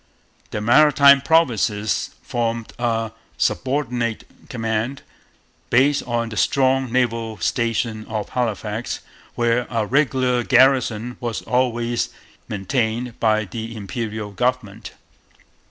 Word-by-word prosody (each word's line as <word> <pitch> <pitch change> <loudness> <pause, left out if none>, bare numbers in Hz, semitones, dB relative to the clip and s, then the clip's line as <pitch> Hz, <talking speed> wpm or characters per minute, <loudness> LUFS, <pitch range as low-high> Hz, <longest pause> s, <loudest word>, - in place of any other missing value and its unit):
The 105 - -4
Maritime 140 +3 +6
Provinces 115 - +1
formed 115 -1 -2
a 115 -2 -1 0.3
subordinate 125 -4 -1 0.3
command, 115 +2 -2 0.7
based 140 +4 +3
on 120 -1 -1
the 110 - -7
strong 130 -1 +2
naval 115 -3 0
station 115 -2 -1
of 110 -2 -4
Halifax, 115 -2 -3 0.3
where 120 +1 +1
a 115 -3 0
regular 130 -1 +2
garrison 125 -2 +3
was 120 -3 -4
always 120 -1 0 0.4
maintained 115 +4 -2
by 110 -1 +2
the 115 +3 -6
Imperial 105 0 -5
government. 115 -1 -2
120 Hz, 100 wpm, -21 LUFS, 110-125 Hz, 0.7 s, Maritime